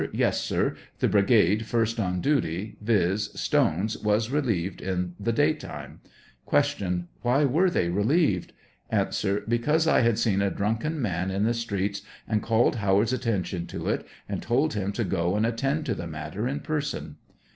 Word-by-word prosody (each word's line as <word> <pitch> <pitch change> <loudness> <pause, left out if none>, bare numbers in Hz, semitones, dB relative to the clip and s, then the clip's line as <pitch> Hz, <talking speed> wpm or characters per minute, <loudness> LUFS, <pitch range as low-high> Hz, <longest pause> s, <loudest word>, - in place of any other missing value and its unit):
Yes, - - +1
sir; - - 0 0.2
the - - +2
brigade 105 +1 +3
first 115 0 0
on 90 -3 -1
duty, 105 - 0
viz: 105 -1 +1
Stone's, 100 +7 +1
was 105 +3 +1
relieved 110 - -1
in 90 -1 -2
the 110 +3 0
day 115 - +3
time. - - -9 0.5
Q. 90 -3 +1 0.2
Why 130 +5 +3
were 160 +8 +3
they 90 - +1
relieved? 105 - +1 0.4
A, - - +1 0.4
Because 150 +8 +2
I 160 - +4
had 115 -2 +3
seen 100 -3 +2
a 100 - +2
drunken 115 +12 -1
man 95 -6 -1
on 95 +2 0
the 115 +2 +2
Streets 100 -4 -2 0.3
and 110 -2 +1
called 115 +3 +2
Howard's 105 +3 +2
attention 100 -8 -2
to - - -4
it, - - 0 0.2
and - - -3
told 135 +7 +1
him 100 -2 -1
to 115 - -1
go 90 -1 0
and 105 +1 +2
attend 135 +7 -1
to 125 - 0
t^e 85 -4 -6
matter 80 +8 -4
in 140 +3 -3
person. 150 -2 -3
110 Hz, 165 wpm, -26 LUFS, 95-120 Hz, 0.5 s, I